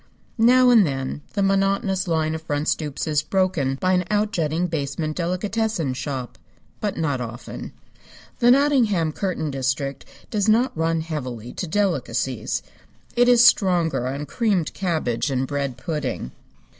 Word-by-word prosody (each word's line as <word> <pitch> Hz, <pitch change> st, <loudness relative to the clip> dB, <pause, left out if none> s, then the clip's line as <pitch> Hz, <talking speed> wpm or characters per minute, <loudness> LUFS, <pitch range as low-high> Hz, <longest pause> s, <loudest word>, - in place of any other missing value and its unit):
Now 250 Hz, +2 st, +6 dB
and 230 Hz, -4 st, +7 dB
then 135 Hz, -2 st, -3 dB
the 200 Hz, -, 0 dB
monotonous 195 Hz, 0 st, +1 dB
line 160 Hz, -2 st, +1 dB
of 160 Hz, -, -4 dB
front 150 Hz, -1 st, -2 dB
stoops 150 Hz, -3 st, -1 dB
is 150 Hz, -2 st, +1 dB
broken 165 Hz, -5 st, 0 dB
by 185 Hz, +7 st, +1 dB
an 180 Hz, -1 st, +2 dB
outjutting 180 Hz, -6 st, 0 dB
basement 155 Hz, 0 st, -3 dB
delicatessen 185 Hz, -, -1 dB
shop. 130 Hz, -2 st, -5 dB, 0.4 s
But 205 Hz, -2 st, -2 dB
not 145 Hz, -6 st, -1 dB
often. 120 Hz, +1 st, -7 dB, 0.7 s
The 240 Hz, -1 st, +5 dB
Nottingham 245 Hz, -, +3 dB
curtain 165 Hz, -3 st, -2 dB
district 135 Hz, +1 st, -2 dB, 0.3 s
does 210 Hz, -1 st, +1 dB
not 240 Hz, +4 st, +3 dB
run 165 Hz, 0 st, 0 dB
heavily 125 Hz, -8 st, -5 dB
to 180 Hz, -, -4 dB
delicacies. 195 Hz, +2 st, -1 dB, 0.5 s
It 245 Hz, 0 st, +4 dB
is 240 Hz, -1 st, +7 dB
stronger 175 Hz, -, +3 dB
on 140 Hz, +3 st, -3 dB
creamed 200 Hz, -5 st, 0 dB
cabbage 155 Hz, -9 st, -1 dB
and 130 Hz, -1 st, 0 dB
bread 140 Hz, -2 st, -3 dB
pudding. 150 Hz, -, -3 dB
165 Hz, 140 wpm, -23 LUFS, 145-200 Hz, 0.7 s, and